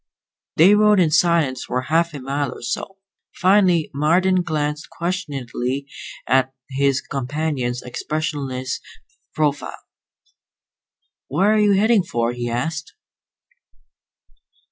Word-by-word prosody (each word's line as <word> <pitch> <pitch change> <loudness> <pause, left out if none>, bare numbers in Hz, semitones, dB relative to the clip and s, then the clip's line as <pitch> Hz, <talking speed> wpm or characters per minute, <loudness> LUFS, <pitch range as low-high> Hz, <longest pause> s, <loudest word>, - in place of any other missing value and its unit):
They 180 +6 +6
rode 210 -1 +5
in 165 -4 +3
silence 155 -5 +2
for 125 - -2
half 165 +2 +1
a - - -5
mile 140 +1 -2
or - - -11
so. 190 +10 -4 0.4
Finally 185 -4 +3
Marden 180 +6 +2
glanced 150 -2 -3
questioningly 140 -7 -3 0.4
at 130 0 +2 0.2
his 135 0 +1
companion's 135 -2 -3
expressionless 135 -1 -3 0.6
profile. 145 -2 -1 1.5
"Where 190 +10 +2
are 215 - +3
you 205 -1 +4
headed 210 0 +3
for?" 120 0 -1
he 120 0 -4
asked. 155 +7 -3
150 Hz, 105 wpm, -21 LUFS, 130-175 Hz, 1.5 s, They